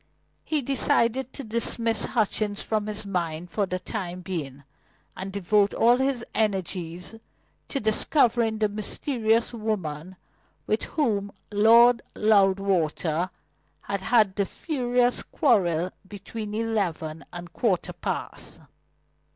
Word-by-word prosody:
He 305 -3 -1
decided 260 -1 +1
to 280 - -6
dismiss 230 0 0
Hutchings 210 -3 0
from 215 -1 -1
his 210 0 -4
mind 175 -3 -3
for 205 -2 0
the 185 - -2
time 185 -2 -5
being, 145 -7 -5 0.5
and 190 +1 -6
devote 200 +1 +2
all 240 +2 +5
his 265 -2 0
energies 180 -4 -2 0.5
to 275 - -2
discovering 225 0 +2
the 215 0 +2
mysterious 225 +2 0
woman 190 -7 -3 0.5
with 215 - 0
whom 205 -9 -1 0.2
Lord 230 +3 +6
Loudwater 190 -5 +2 0.5
had 200 -1 -3
had 215 -3 +3
the 200 -1 0
furious 245 -5 0
quarrel 185 - +1 0.2
between 210 +1 -6
eleven 180 -8 -2
and 175 0 -7
a - - -25
quarter 195 -3 0
past. - - -5
210 Hz, 115 wpm, -26 LUFS, 185-230 Hz, 0.5 s, Lord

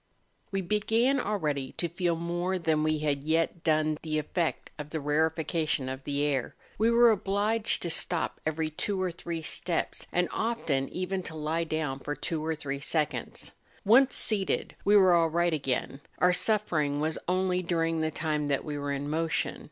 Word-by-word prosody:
We 195 -1 0
began 225 +8 +2
already 150 - -1
to 170 - -2
feel 175 0 0
more 175 +3 -1
than 160 -3 +1
we 155 0 +1
had 140 -2 0
yet 165 +2 0
done 155 -1 +2
the 155 -1 -2
effect 160 +2 -2
of 150 0 -6
the 160 - -3
rarefaction 155 -1 0
of 130 0 -6
the 145 0 -1
air; 140 -4 -1 0.2
we 225 +2 +4
were 235 0 +6
obliged 210 +2 0
to 170 - -1
stop 165 0 0
ever}^ 155 0 -2
two 200 +2 -1
or 185 -1 0
three 165 -1 -5
steps, 170 +2 -2
and 175 0 +2
often 160 -13 -1
even 185 +1 -2
to 165 -3 -8
lie 155 +2 -1
down 155 -4 -2
for 145 +2 -4
two 160 0 -3
or 160 0 -1
three 140 -2 -4
seconds. 150 +1 -2 0.3
Once 255 +6 +6
seated 205 -3 -1
we 205 +1 +6
were 185 -3 +6
all 165 -1 +4
right 170 +1 +1
again; 135 -1 -2 0.2
our 180 0 +4
suffering 165 -9 +1
was 155 +1 -1
only 185 0 +1
during 165 -2 0
the 160 - +1
time 155 -1 -1
that 140 -1 0
we 150 -1 -4
were 145 0 -2
in 140 +1 -2
motion. 160 +1 -1
165 Hz, 180 wpm, -29 LUFS, 150-185 Hz, 0.3 s, were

